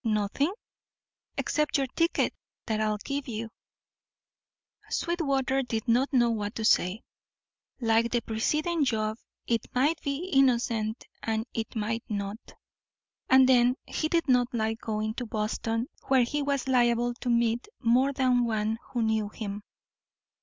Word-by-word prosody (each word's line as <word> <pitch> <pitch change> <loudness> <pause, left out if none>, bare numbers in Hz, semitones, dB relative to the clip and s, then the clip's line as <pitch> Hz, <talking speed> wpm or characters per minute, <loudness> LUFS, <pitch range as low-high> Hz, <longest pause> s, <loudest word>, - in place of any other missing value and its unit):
"Nothing?" 215 - +1 0.9
"Except 300 -1 +1
your 275 - +1
ticket; 330 +6 0 0.3
that 215 -1 -1
I'll 215 -1 +1
give 280 +7 -4
you." 225 -1 -5 1.4
Sweetwater 275 -6 0
did 235 -2 -3
not 250 +5 +3
know 240 -3 +4
what 210 -2 -3
to 220 - -2
say. 190 +1 +2 0.8
Like 230 -1 +2
the 240 0 0
preceding 305 +10 0
job 220 -3 -1 0.3
it 230 -2 0
might 295 +6 +2
be 300 +6 -3
innocent 235 -4 +2 0.2
and 220 0 -1
it 225 0 -4
might 225 +1 -2
not. 200 0 -3 0.9
And 260 0 +7
then, 250 -1 +5
he 310 - -2
did 335 0 +1
not 250 -2 +4
like 220 0 -1
going 215 0 -2
to 245 0 -5
Boston, 225 +2 -2 0.2
where 265 -2 +5
he 290 +5 -1
was 280 -2 -1
liable 240 -1 +3
to 245 - -2
meet 235 - +1
more 255 +3 +3
than 255 -3 +2
one 220 0 -1
who 240 -2 +1
knew 220 -1 +1
him. 205 -1 -6
235 Hz, 140 wpm, -28 LUFS, 220-265 Hz, 1.4 s, And